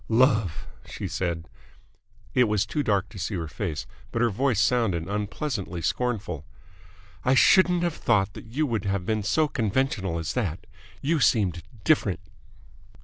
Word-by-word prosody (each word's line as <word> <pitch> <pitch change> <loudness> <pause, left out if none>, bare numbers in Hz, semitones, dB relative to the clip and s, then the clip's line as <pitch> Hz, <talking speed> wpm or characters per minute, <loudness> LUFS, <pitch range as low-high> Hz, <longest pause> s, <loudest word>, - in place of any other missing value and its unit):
"Love!" 110 - +3 0.2
she - - -6
said. 85 -3 -2 0.9
It 125 - +5
was 105 -2 +1
too 145 +9 -1
dark 100 -8 +1
to 100 - -10
see 100 +3 -2
her 85 -3 -3
face, 80 -2 -4 0.3
but - - -2
her 120 - +3
voice 120 0 +1
sounded 100 -7 +2
unpleasantly 105 - -3
scornful. 105 - -1 0.8
"I 130 - +3
shouldn't 180 +4 +5
have 175 -2 +1
thought 100 -4 +2
that - - -10
you 140 +7 0
would 115 -6 -2
have 100 -2 -1
been 110 +1 0
so 155 +10 +2
conventional 110 - 0
as 80 -1 -3
that. 95 -8 -2 0.4
You 155 +3 +2
seemed 100 - +2 0.2
different." 110 - +2
105 Hz, 150 wpm, -26 LUFS, 95-125 Hz, 0.9 s, It